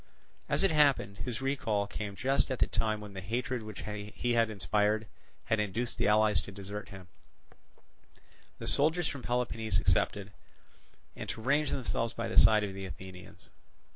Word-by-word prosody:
As -, -, +1 dB
it 195 Hz, -, +4 dB
happened, 140 Hz, -10 st, +3 dB
his 120 Hz, -1 st, -4 dB
recall 125 Hz, -7 st, 0 dB
came 100 Hz, 0 st, -5 dB
just 135 Hz, +7 st, +2 dB
at 130 Hz, -, -1 dB
the -, -, +3 dB
time 110 Hz, -2 st, -1 dB
when 105 Hz, -1 st, -9 dB
the 95 Hz, -, -6 dB
hatred 120 Hz, +4 st, -2 dB
which 110 Hz, -3 st, -8 dB
he 105 Hz, +3 st, -3 dB
had 115 Hz, -1 st, +3 dB
inspired 105 Hz, +1 st, +1 dB, 0.4 s
had 110 Hz, -, +1 dB
induced 110 Hz, +4 st, -1 dB
the -, -, +2 dB
allies 105 Hz, 0 st, +4 dB
to -, -, -9 dB
desert 100 Hz, +1 st, -7 dB
him, 95 Hz, -2 st, -11 dB, 1.5 s
the -, -, -7 dB
soldiers 160 Hz, +3 st, +2 dB
from 135 Hz, 0 st, -4 dB
Peloponnese 115 Hz, -3 st, 0 dB
excepted, 95 Hz, +2 st, +1 dB, 0.8 s
and -, -, -7 dB
to -, -, -4 dB
range 145 Hz, +3 st, +2 dB
themselves 115 Hz, -2 st, -1 dB
by 115 Hz, -, -3 dB
the -, -, -5 dB
side 110 Hz, -1 st, +7 dB
of 100 Hz, -2 st, -3 dB
the 95 Hz, 0 st, -6 dB
Athenians. 95 Hz, 0 st, -11 dB
110 Hz, 170 wpm, -31 LUFS, 100-125 Hz, 1.5 s, side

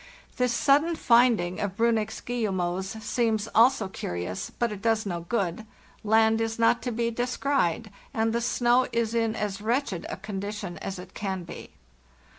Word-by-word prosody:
This 250 Hz, -1 st, +2 dB
sud 275 Hz, +4 st, +4 dB
den 335 Hz, +1 st, -2 dB
finding 235 Hz, -, +3 dB
of 200 Hz, -1 st, -3 dB
Briinnich's 225 Hz, -2 st, +1 dB
guillemots 190 Hz, -3 st, -2 dB
seems 225 Hz, -2 st, 0 dB
also 225 Hz, -2 st, +4 dB
curt 90 Hz, -, -4 dB
ous, 95 Hz, -, -5 dB
but 235 Hz, -2 st, -2 dB
it 205 Hz, -2 st, -7 dB
does 225 Hz, -1 st, +1 dB
no 175 Hz, -3 st, -2 dB
good. 200 Hz, -3 st, -1 dB, 0.4 s
Land 220 Hz, +1 st, +4 dB
is 225 Hz, 0 st, -2 dB
not 230 Hz, +1 st, +3 dB
to 245 Hz, -, -3 dB
be 235 Hz, 0 st, -1 dB
descried, 240 Hz, -, 0 dB, 0.2 s
and 225 Hz, 0 st, 0 dB
the 235 Hz, -, 0 dB
snow 245 Hz, +1 st, +2 dB
is 230 Hz, -1 st, 0 dB
in 225 Hz, -1 st, +1 dB
as 205 Hz, -2 st, -3 dB
wretched 225 Hz, -5 st, -1 dB
a -, -, -5 dB
conditien 200 Hz, -1 st, -5 dB
as 195 Hz, -, -5 dB
it 180 Hz, +1 st, -10 dB
can 190 Hz, -3 st, -3 dB
be. 170 Hz, -, -9 dB
220 Hz, 170 wpm, -27 LUFS, 195-235 Hz, 0.4 s, sud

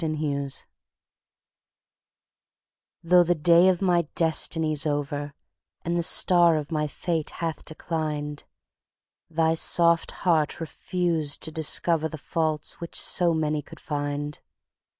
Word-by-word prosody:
To -, -, 0 dB
Augusta 145 Hz, -3 st, -2 dB, 2.4 s
THOUGH 175 Hz, +1 st, +5 dB
the 175 Hz, +1 st, +1 dB
day 170 Hz, +3 st, +5 dB
of 185 Hz, +1 st, 0 dB
my 175 Hz, -3 st, +2 dB
destiny's 160 Hz, -2 st, +2 dB
over, 145 Hz, 0 st, -3 dB, 0.5 s
And 170 Hz, +1 st, -1 dB
the 170 Hz, -, +1 dB
star 170 Hz, -1 st, +4 dB
of 150 Hz, 0 st, -5 dB
my 150 Hz, -1 st, -1 dB
fate 160 Hz, +2 st, -3 dB
hath 165 Hz, -3 st, -4 dB
declined, 155 Hz, -2 st, -4 dB, 0.8 s
Thy 160 Hz, 0 st, +1 dB
soft 170 Hz, 0 st, +3 dB, 0.2 s
heart 160 Hz, -4 st, +2 dB
refused 165 Hz, -1 st, -2 dB
to 160 Hz, -, -1 dB
discoverThe 160 Hz, 0 st, +1 dB
faults 155 Hz, -1 st, -2 dB
which 170 Hz, -, -2 dB
so 175 Hz, -2 st, +1 dB
many 155 Hz, -1 st, -1 dB
could 165 Hz, +2 st, -14 dB
find. 145 Hz, 0 st, -4 dB
160 Hz, 115 wpm, -25 LUFS, 150-170 Hz, 2.4 s, THOUGH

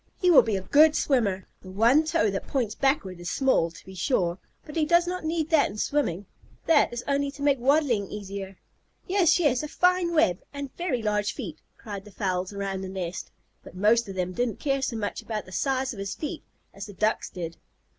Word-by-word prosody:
He 360 Hz, -3 st, +4 dB
will 320 Hz, -, +9 dB
be 220 Hz, -3 st, -1 dB
a 190 Hz, -, -2 dB
good 300 Hz, +10 st, +5 dB
swimmer. 205 Hz, -9 st, +1 dB, 0.2 s
The 185 Hz, -, -11 dB
one 230 Hz, +10 st, +4 dB
toe 215 Hz, -9 st, +1 dB
that 195 Hz, -, -4 dB
points 240 Hz, -6 st, -1 dB
backward 230 Hz, -, 0 dB
is 175 Hz, 0 st, -5 dB
small, 260 Hz, -11 st, +2 dB
to 165 Hz, -, -15 dB
be 190 Hz, -, -11 dB
sure, 180 Hz, -, 0 dB, 0.3 s
but 300 Hz, -, -10 dB
he 320 Hz, -, +2 dB
does 345 Hz, +3 st, +4 dB
not 365 Hz, 0 st, -4 dB
need 320 Hz, 0 st, -1 dB
that 315 Hz, -3 st, +4 dB
in 200 Hz, -, -9 dB
swimming. 205 Hz, -, -1 dB, 0.4 s
That 320 Hz, -3 st, +4 dB
is 240 Hz, 0 st, -5 dB
only 280 Hz, 0 st, +1 dB
to 285 Hz, 0 st, -8 dB
make 280 Hz, -2 st, +3 dB
waddling 255 Hz, -6 st, +2 dB
easier." 195 Hz, -2 st, -7 dB, 0.5 s
"Yes, 370 Hz, -3 st, +3 dB
yes," 290 Hz, -8 st, +2 dB
"A 305 Hz, -, -4 dB
fine 360 Hz, +2 st, +2 dB
web," 185 Hz, -, +3 dB
and 280 Hz, -2 st, -7 dB
"Very 300 Hz, -10 st, -2 dB
large 210 Hz, -1 st, 0 dB
feet," 175 Hz, -, -7 dB, 0.2 s
cried 200 Hz, -3 st, -7 dB
the 210 Hz, -, -14 dB
fowls 185 Hz, -1 st, -2 dB
around 195 Hz, -1 st, -3 dB
the 190 Hz, -, -5 dB
nest, 185 Hz, -1 st, -5 dB, 0.3 s
but -, -, -13 dB
most 215 Hz, +3 st, +3 dB
of 195 Hz, -, -6 dB
them 185 Hz, 0 st, -2 dB
didn't 240 Hz, +2 st, -1 dB
care 275 Hz, -2 st, 0 dB
so 260 Hz, -3 st, -2 dB
much 210 Hz, -2 st, -3 dB
about 215 Hz, -2 st, -4 dB
the 185 Hz, -, -13 dB
size 265 Hz, +4 st, -1 dB
of 205 Hz, -, -10 dB
his 195 Hz, 0 st, -4 dB
feet 290 Hz, +7 st, -5 dB, 0.3 s
as 200 Hz, +1 st, -8 dB
the 205 Hz, -, -10 dB
Ducks 215 Hz, +3 st, 0 dB
did. 170 Hz, -2 st, -6 dB
225 Hz, 215 wpm, -26 LUFS, 195-285 Hz, 0.5 s, will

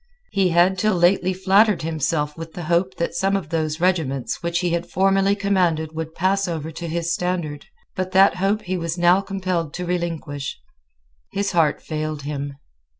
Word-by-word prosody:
He 195 Hz, -2 st, +2 dB
had 180 Hz, +2 st, +3 dB
till 215 Hz, 0 st, +2 dB
lately 180 Hz, +1 st, +3 dB
flattered 190 Hz, +1 st, +3 dB
himself 150 Hz, -1 st, -1 dB
with 165 Hz, 0 st, -8 dB
the 175 Hz, -, -6 dB
hope 175 Hz, +3 st, +1 dB
that 170 Hz, -, -2 dB
some 195 Hz, +2 st, +1 dB
of 190 Hz, -6 st, -3 dB
those 155 Hz, -1 st, -1 dB
regiments 160 Hz, -8 st, 0 dB
which 170 Hz, +1 st, -1 dB
he 175 Hz, -1 st, 0 dB
had 170 Hz, +1 st, -2 dB
formerly 195 Hz, +1 st, +3 dB
commanded 180 Hz, -6 st, +1 dB
would 160 Hz, 0 st, -5 dB
pass 195 Hz, +2 st, +1 dB
over 160 Hz, -2 st, -4 dB
to 170 Hz, +2 st, -6 dB
his 170 Hz, +1 st, -1 dB
standard: 175 Hz, -5 st, -3 dB, 0.3 s
but 185 Hz, 0 st, -2 dB
that 190 Hz, -1 st, +5 dB
hope 200 Hz, +3 st, +1 dB
he 185 Hz, -1 st, -2 dB
was 165 Hz, 0 st, -3 dB
now 175 Hz, +2 st, +4 dB
compelled 185 Hz, -5 st, -3 dB
to 180 Hz, -, -4 dB
relinquish. 165 Hz, -5 st, -3 dB, 0.7 s
His 200 Hz, 0 st, -1 dB
heart 165 Hz, -5 st, +2 dB
failed 155 Hz, -2 st, -4 dB
him. 140 Hz, -1 st, -4 dB
175 Hz, 175 wpm, -22 LUFS, 160-190 Hz, 0.7 s, that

